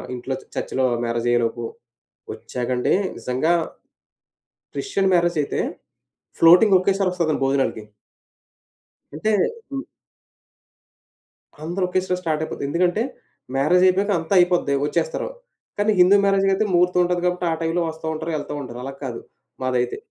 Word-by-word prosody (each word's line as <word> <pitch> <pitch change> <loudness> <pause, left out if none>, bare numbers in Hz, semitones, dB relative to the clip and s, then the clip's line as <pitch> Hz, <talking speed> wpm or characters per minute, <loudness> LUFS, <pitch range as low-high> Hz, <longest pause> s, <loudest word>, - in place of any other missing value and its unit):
ఇంట్లో 130 +2 -4 0.2
చర్చ్‌లో 130 - -1 0.2
మ్యారేజ్ 115 0 -2
అయ్యేలోపు 120 0 0 0.7
వచ్చాకండీ 125 0 -2 0.2
నిజంగా 130 +7 0 1.2
క్రిస్టియన్ 195 - 0
మ్యారేజయితే 170 -4 +1 0.8
ఫ్లోటింగ్ 180 +5 +7
ఒకేసారి 195 0 +1
వస్తదండీ 165 -5 -1
భోజనాలకి. 135 -5 0 1.3
అంటే 155 +9 -1 0.4
హ్మ్. 275 0 -3 1.8
అందరూ 175 +4 -2
ఒకేసారి 180 0 -1
స్టార్ట్ 155 -3 -1
అయిపోద్ది. 150 - -6
ఎందుకంటే 180 +6 +1 0.5
మ్యారేజయిపోయాక 185 +7 +3
అంతా 165 +4 -2
అయిపోద్ది 175 -5 +2
వచ్చేస్తారు. - - -1 0.5
కాని 205 +1 +2
హిందూ 185 +3 +7
మ్యారేజ్‌కైతే 195 +1 +2
ముహూర్తం 180 +1 +3
ఉంటది. 175 0 -1
కాబట్టి 180 0 -1
ఆ - - +1
టైం‌లో 165 +2 0
వస్తా 160 0 -9
ఉంటారు 160 +1 -4
యెళ్తా 145 0 -5
ఉంటారు. 120 -2 -8
అలా 135 - -5
కాదు 120 -3 -5 0.4
మాదైతే. 125 -1 0
170 Hz, 115 wpm, -22 LUFS, 135-185 Hz, 1.8 s, ఫ్లోటింగ్